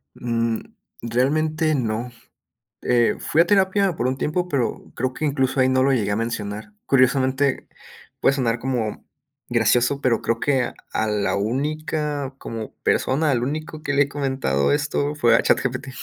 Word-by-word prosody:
Mm, 115 -1 -1 0.4
realmente 155 +6 +1
no, 120 0 -2 0.7
eh, 120 -2 +2
fui 160 - +2
a - - +4
terapia 195 -1 +3
por 125 - -1
un 130 +1 -1
tiempo, 175 +6 -1
pero, 135 -7 -2
creo 130 +1 -1
que 155 - -3
incluso 135 -2 0
ahí 130 0 +4
no 130 0 +3
lo 135 - +3
llegué 105 -5 0
a - - +1
mencionar, 110 - -4
curiosamente, 130 +1 +2 0.5
puede 135 - +3
sonar 120 -3 0
como 120 -4 -3 0.4
gracioso, 120 +3 +2
pero 120 -3 +2
creo 115 0 -1
que 130 -4 +1 0.2
a 110 - 0
la 105 -1 0
única 145 +4 -2
como 115 -4 -7
persona, 145 +3 +2
al 120 -2 +1
único 155 +2 -4
que 145 - -1
le 140 0 +5
he 140 - -6
comentado 130 - 0
esto 145 0 0
fue 120 -5 +4
a - - +4
ChatGPT. 130 +1 0
130 Hz, 160 wpm, -22 LUFS, 115-145 Hz, 0.7 s, le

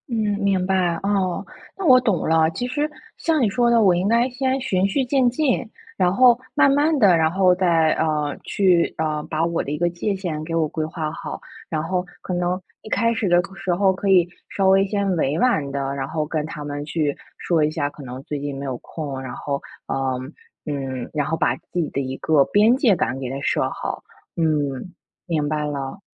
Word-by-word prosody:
嗯， 235 - -2 0.2
明 195 -3 +1
白。 185 -3 +1
哦， 195 -3 0 0.3
那 390 - -4
我 255 -5 +8
懂 215 -8 0
了， 160 0 +4
其 245 +9 -3
实 290 +4 -1 0.3
像 320 -3 +1
你 225 - +3
说 240 +3 +2
的， 235 -1 +4
我 190 -4 +5
应 180 +3 0
该 235 +3 +3
先 260 +1 -1
循 195 -8 +1
序 260 +7 0
渐 255 -1 +3
进， 255 0 0 0.3
然 180 -1 +3
后 245 +2 +6 0.2
慢 290 - +5
慢 295 +3 +3
地 195 -7 +6
然 160 -1 +2
后 185 0 +4
再， 170 -4 +3
呃， 150 -2 0
去 180 -4 +2
呃， 155 -1 -1
把 160 +1 0
我 170 0 -1
的 140 - -5
一 150 - -2
个 175 +2 +1
界 175 +4 -2
限 170 -5 -4
给 165 +1 -5
我 160 -2 +2
规 155 +1 -3
划 155 -1 -4
好。 165 - -6 0.3
然 155 -2 -1
后 180 +2 -1 0.2
可 185 - -4
能 180 +1 0 0.2
一 - - -11
开 230 +2 +2
始 220 -4 -1
的 175 0 +5
时 185 -2 -1
候 190 +1 +3
可 195 +1 -2
以 180 -3 +5 0.2
稍 195 -1 +1
微 195 +1 +5
先 200 0 -1
委 155 -1 0
婉 155 - +1
地 135 0 -2
然 135 -1 -2
后 155 +1 -2
跟 155 0 -2
他 155 -2 -7
们 145 0 -4
去 150 -1 -1 0.2
说 165 -3 +1
一 150 - +2
下， 145 -2 -1
可 145 - -12
能 130 0 -7
最 150 0 -4
近 140 -1 -4
没 140 - -5
有 130 -2 -3
空， 140 -4 -6
然 130 -2 -6
后， 140 +1 -3 0.3
呃， 130 -1 -1 0.5
嗯 135 -4 -4
然 150 -2 0
后 160 +1 -1
把 - - +1
自 180 - -6
己 160 - 0
的 140 - -1
一 130 0 -4
个 155 -3 +3
边 215 +4 +4
界 250 -7 +3
感 130 - -1
给 130 -2 -4
它 135 +2 -4
设 - - +1
好， - - -5 0.3
嗯， 150 0 -1 0.3
明 160 -5 -1
白 150 0 -1
了。 140 +3 -4
170 Hz, 235 characters per minute, -22 LUFS, 150-200 Hz, 0.5 s, 我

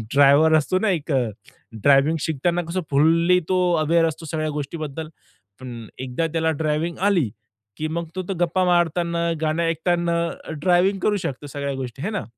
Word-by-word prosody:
Driver 145 +3 +6
असतो 170 +5 0
ना 220 - +1
एक 155 +2 -8 0.7
ड्रायव्हिंग 140 +5 +4
शिकताना 170 +3 0
कसं 185 +2 -1
फुल्ली 165 +5 +4
तो 185 -1 +2 0.2
अवेअर 165 +2 +3
असतो 160 +1 -6
सगळ्या 155 -1 -1
गोष्टीबद्दल 155 +1 -5 0.5
पण 120 -3 -8
एकदा 130 +6 -2
त्याला 160 -1 +1
ड्रायव्हिंग 155 +3 -1
आली 170 - +2 0.5
की 155 - -2
मग 170 +2 -3
तर 185 - -2
तो - - 0
गप्पा 175 +2 +1
मारताना 170 -1 +1
गाणे 160 +1 0
ऐकताना 170 +1 0 0.4
ड्रायव्हिंग 185 +2 +3
करू 205 +2 +1
शकतो 145 -5 -5
सगळ्या 140 0 -4
गोष्टी 130 0 -6
आहे 205 - -2
ना. 205 -4 -3
165 Hz, 160 wpm, -22 LUFS, 145-175 Hz, 0.7 s, Driver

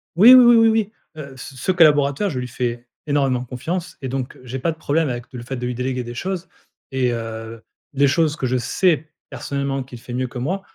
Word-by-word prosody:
Oui, 225 +8 +9
oui, 255 -1 +9
oui, 240 -1 +7
oui, 225 0 +6
oui. 220 -2 +1 0.3
Heu, 140 -3 -8
c 135 - -9
ce 185 - 0
collaborateur, 150 +1 +4
je 135 -7 -3
lui 125 - -4
fais 120 -1 -3 0.2
énormément 135 -4 +1
confiance 165 +9 -5
et 135 - -4
donc 130 -1 -4
j'ai 130 +1 -5
pas 165 - 0
de 160 - -9
problème 155 -1 0
avec 120 -1 -4
le 125 - -7
fait 130 +2 -5
de 125 - -4
lui 125 - -2
déléguer 125 0 -2
des 120 - -7
choses 185 +7 -4 0.4
et 130 -2 +1
heu, 115 -1 -6 0.3
les 140 +1 +3
choses 150 +2 +2
que 135 - -3
je 130 0 +1
sais 155 +5 +1 0.2
personnellement 140 -1 -3
qu'il 125 -2 -11
fait 120 - -9
mieux 130 +1 -1
que 125 - -9
moi, 175 +11 -2
135 Hz, 230 wpm, -21 LUFS, 125-165 Hz, 0.4 s, Oui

